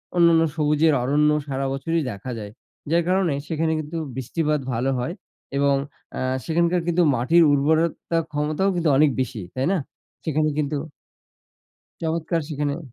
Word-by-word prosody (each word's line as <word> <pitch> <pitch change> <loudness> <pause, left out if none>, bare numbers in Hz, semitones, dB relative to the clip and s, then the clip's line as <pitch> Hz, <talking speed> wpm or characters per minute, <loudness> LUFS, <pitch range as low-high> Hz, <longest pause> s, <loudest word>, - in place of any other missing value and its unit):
অন্যান্য 170 -1 +5
সবুজের 150 0 +3
অরণ্য 150 +3 +3 0.2
সারা 135 0 -2
বছরই 165 +4 -1
দেখা 105 +5 -7
যায়। 105 -1 -7 0.4
যার 170 0 +3
কারণে 185 -4 +2
সেখানে 160 0 0
কিন্তু 155 +2 -5 0.2
বৃষ্টিপাত 150 +4 -1
ভালো 125 +4 0
হয় 160 +8 -2 0.4
এবং 140 0 +3 0.4
আ - - -2 0.2
সেখানকার 170 +1 +2
কিন্তু 175 +1 +3
মাটির 165 +8 +4
উর্বরতা 160 +3 +1
ক্ষমতাও 155 +6 0
কিন্তু 170 -2 +1
অনেক 150 0 +5
বেশি, 115 -4 -4
তাই 130 +1 0
না? - - +2 0.5
সেখানে 155 0 +1
কিন্তু 150 0 0 1.2
চমৎকার 165 +1 -1
সেখানেও 145 +1 -2
155 Hz, 140 wpm, -23 LUFS, 140-165 Hz, 1.2 s, অন্যান্য